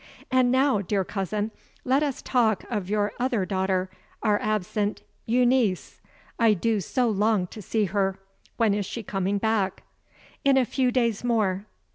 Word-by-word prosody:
"And 255 -1 +4
now, 260 -5 +3
dear 195 0 0
cousin, 205 +3 -2 0.3
let 265 +3 +3
us 285 -4 -2
talk 225 -5 +2
of 205 -5 -2
your 210 0 +1
other 240 -6 0
daughter, 190 -1 -1 0.3
our 210 -2 +3
absent 210 0 -1 0.2
Euneece. 240 -4 +1 0.4
I 225 -2 +5
do 220 +2 0
so 250 +6 0
long 210 -2 +2
to 210 +4 -10
see 215 +2 0
her. 195 0 0 0.4
When 225 -4 +3
is 200 -2 -2
she 230 - -5
coming 195 0 -1
back?" 205 -2 0 0.6
"In 275 -1 +4
a 260 - +4
few 255 +1 +1
days 235 -4 0
more." 210 -4 0
215 Hz, 155 wpm, -26 LUFS, 195-240 Hz, 0.6 s, I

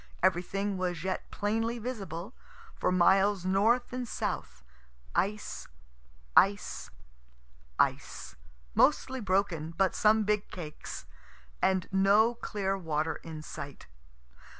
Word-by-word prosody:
Everything 190 +2 +1
was 180 -3 -2
yet 190 0 -3
plainly 225 +3 -1
visible; 210 -5 -5 0.4
for - - 0
miles 190 +1 +4
north 220 +7 +2
and 250 -1 -3
south, 60 - -4 0.5
ice, 210 +2 -1 0.7
ice, 200 +1 +3 0.9
ice, - - 0 0.4
mostly 260 0 +3
broken, 185 -6 0
but 190 -1 +3
some 220 0 +4
big 210 0 0
cakes, 155 - -7 0.6
and 190 -2 +2
no 200 +4 +5
clear 200 -4 -2
water 160 -3 -1
in 155 -2 -8
sight. 140 -2 -8
195 Hz, 105 wpm, -30 LUFS, 175-210 Hz, 0.9 s, no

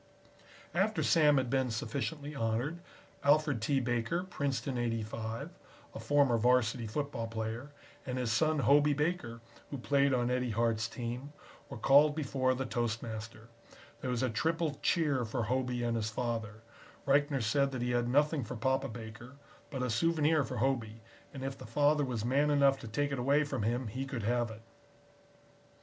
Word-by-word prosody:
After 200 +5 +1
Sam 150 -3 +5
had 130 -2 0
been 130 -2 +1
sufficiently 140 +7 -3
honored, 120 +6 -1 0.4
Alfred 145 -4 +3
T. 135 +4 +1
Baker, 120 +8 -1
Princeton 140 -6 -2
'85, 115 -1 -3 0.4
a - - -7
former 140 -5 +3
Varsity 120 -1 +2
football 130 -1 -3
player, 115 +4 -4 0.3
and 130 -1 -4
his 125 -3 -1
son 155 +5 +2
Hobey 145 +1 +5
Baker, 150 -7 -2 0.3
who 140 - -5
played 140 +2 +2
on 125 -1 +1
Eddie 125 0 0
Hart's 115 0 +1
team, 125 +5 -6 0.4
were - - -7
called 145 +2 +5
before 130 -4 0
the 135 +1 -3
toastmaster. 115 -1 -4 0.5
There 130 - -4
was 125 0 0
a 130 - +1
triple 160 +4 -1
cheer 150 -7 +2
for 115 +1 -2
Hobey 125 +1 -1
and 120 -1 0
his 110 -1 -1
father. 110 -2 -4 0.4
Reichner 140 -2 +2
said 140 +5 +2
that 130 -3 -4
he 125 - 0
had 120 0 +1
nothing 145 +2 +2
for 120 +3 -6
Papa 130 +3 0
Baker, 115 +2 -9 0.4
but 135 -4 -3
a 125 - -1
souvenir 155 +3 +2
for 130 -2 -5
Hobey, 115 -3 -1 0.3
and 135 -2 -7
if 135 0 -3
the 130 - -11
father 145 +5 +3
was 120 -5 -2
man 140 +4 +2
enough 140 -2 +4
to 115 - -8
take 140 +6 -1
it 140 - -2
away 140 +4 +3
from 145 - -3
him 120 +4 0
he 130 +5 -4
could 130 -5 -4
have 120 +1 +1
it. 110 0 -11
130 Hz, 170 wpm, -32 LUFS, 115-145 Hz, 0.5 s, Sam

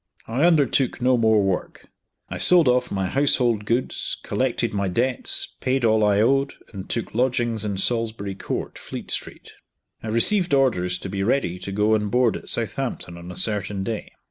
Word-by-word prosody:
I 125 +8 +1
undertook 145 -6 +2
no 125 0 +3
more 110 -3 +3
work. 95 -2 -3 0.4
I - - -6
sold 175 -5 +5
off 125 0 +2
my 95 -1 -1
household 120 -2 +1
goods, 120 +4 -2
collected 125 -3 -1
my 100 -1 -1
debts, 120 +7 +1
paid 130 -1 0
all 110 -1 +3
I 105 -1 +3
owed, 135 +4 +2 0.2
and 95 -2 -8
took 115 - -3
lodgings 120 -2 0
in 100 -2 -2
Salisbury 110 -2 -1
Court, 95 - -5
Fleet - - -8
Street. - - -5 0.5
I - - -7
received 160 - +2
orders 90 -10 +1
to 95 - -7
be 95 +1 -3
ready 100 -5 0
to 100 - -6
go 105 +2 +2
on 105 -1 +1
board 120 -1 +2
at - - -6
Southampton 85 - -3
on 85 +1 -9
a 90 - -9
certain 100 -2 -1
day. 110 +1 -4
115 Hz, 175 wpm, -23 LUFS, 100-125 Hz, 0.5 s, sold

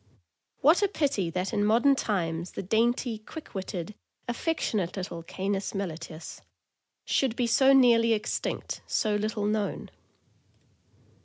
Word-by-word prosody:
What 320 +8 +5
a 405 - +4
pity 275 - 0
that 180 +5 -3
in 205 -1 +1
modern 235 +6 +4
times 170 -7 -2
the - - -5
dainty, 230 +3 +1
quick 310 +8 -10
witted, 190 0 -5 0.3
affectionate 235 - -1
little 180 -3 -5
Canis 195 +4 -3
Melitceus 165 -4 -6 0.6
should 260 -4 +1
be 245 - +1
so 265 +4 +5
nearly 235 -4 +5
extinct, 215 0 -3
so 215 -2 +1
little 210 0 -1
known. 210 -1 -2
215 Hz, 125 wpm, -28 LUFS, 190-240 Hz, 0.6 s, What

